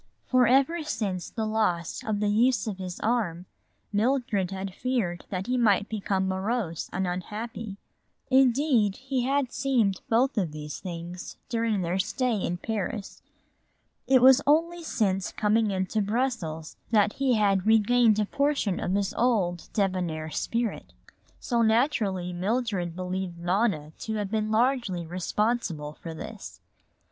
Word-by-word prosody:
For 255 Hz, -2 st, +4 dB
ever 275 Hz, +7 st, +3 dB
since 200 Hz, -, -3 dB
the 220 Hz, -2 st, -3 dB
loss 210 Hz, -6 st, -1 dB
of 215 Hz, -2 st, -2 dB
the 210 Hz, -, +2 dB
use 230 Hz, 0 st, +3 dB
of 205 Hz, -4 st, -4 dB
his 180 Hz, -2 st, -6 dB
arm 205 Hz, -7 st, 0 dB, 0.5 s
Mildred 215 Hz, -4 st, +1 dB
had 190 Hz, 0 st, -5 dB
feared 205 Hz, -8 st, -2 dB
that 190 Hz, -1 st, -3 dB
he 250 Hz, +2 st, 0 dB
might 205 Hz, -3 st, +3 dB
become 195 Hz, -3 st, -1 dB
morose 190 Hz, -2 st, -2 dB
and 190 Hz, 0 st, -1 dB
unhappy. 210 Hz, +3 st, -5 dB, 0.5 s
Indeed, 255 Hz, -5 st, +4 dB
he 260 Hz, -1 st, -2 dB
had 270 Hz, -2 st, +1 dB
seemed 230 Hz, -8 st, +1 dB
both 240 Hz, +1 st, +2 dB
of 170 Hz, -6 st, -2 dB
these 150 Hz, -1 st, -6 dB
things 175 Hz, 0 st, -7 dB
during 225 Hz, -4 st, 0 dB
their 175 Hz, +3 st, -1 dB
stay 240 Hz, +5 st, 0 dB
in 175 Hz, -3 st, -2 dB
Paris. 210 Hz, 0 st, -4 dB, 0.9 s
It 260 Hz, -2 st, +5 dB
was 265 Hz, +1 st, +8 dB
only 335 Hz, +4 st, +3 dB
since 200 Hz, -, 0 dB
coming 215 Hz, +1 st, +2 dB
into 190 Hz, +2 st, -1 dB
Brussels 200 Hz, -8 st, -2 dB
that 210 Hz, -2 st, +3 dB
he 270 Hz, -3 st, +1 dB
had 200 Hz, -2 st, +2 dB
regained 225 Hz, 0 st, +4 dB
a 210 Hz, -, +2 dB
portion 280 Hz, -6 st, 0 dB
of 185 Hz, -, -1 dB
his 200 Hz, -1 st, 0 dB
old 200 Hz, -8 st, 0 dB
debonair 180 Hz, -6 st, -1 dB
spirit. 230 Hz, +4 st, -2 dB, 0.5 s
So 235 Hz, -2 st, 0 dB
naturally 220 Hz, -6 st, +1 dB
Mildred 195 Hz, -2 st, -1 dB
believed 185 Hz, -1 st, -4 dB
Nona 175 Hz, -3 st, 0 dB
to 220 Hz, -, -3 dB
have 205 Hz, -2 st, -3 dB
been 215 Hz, -1 st, 0 dB
largely 220 Hz, -6 st, +1 dB
responsible 180 Hz, -3 st, -1 dB
for 165 Hz, -1 st, -6 dB
this. -, -, -8 dB
210 Hz, 140 wpm, -27 LUFS, 185-240 Hz, 0.9 s, was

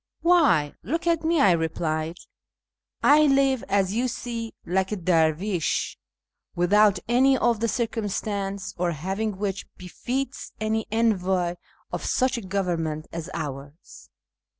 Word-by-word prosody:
" -, -, -57 dB
Why, 300 Hz, -, +4 dB
look 325 Hz, -, -3 dB
at 335 Hz, -1 st, +1 dB
me," 325 Hz, 0 st, +2 dB
I 200 Hz, -, +6 dB
replied; 160 Hz, 0 st, -1 dB, 0.5 s
" -, -, -46 dB
I 305 Hz, 0 st, +5 dB
live, 270 Hz, -2 st, +3 dB
as 195 Hz, -1 st, +2 dB
you 245 Hz, +3 st, +1 dB
see, 230 Hz, -1 st, -5 dB
like 190 Hz, +2 st, 0 dB
a -, -, 0 dB
dervish, 170 Hz, 0 st, +1 dB, 0.6 s
without 200 Hz, +3 st, +4 dB
any 260 Hz, +3 st, +4 dB
of 235 Hz, -3 st, +2 dB
the 230 Hz, -, +1 dB
circumstance 200 Hz, -4 st, -2 dB
or 175 Hz, -1 st, +1 dB
having 195 Hz, +6 st, -3 dB
which 195 Hz, -1 st, -3 dB
befits 250 Hz, +9 st, -4 dB
an 220 Hz, 0 st, 0 dB
envoy 190 Hz, -6 st, +1 dB, 0.4 s
of -, -, -3 dB
such 260 Hz, +1 st, +1 dB
a -, -, -8 dB
government 175 Hz, -6 st, -2 dB
as 170 Hz, +1 st, -6 dB
ours." 145 Hz, 0 st, -8 dB
200 Hz, 135 wpm, -25 LUFS, 175-235 Hz, 0.6 s, I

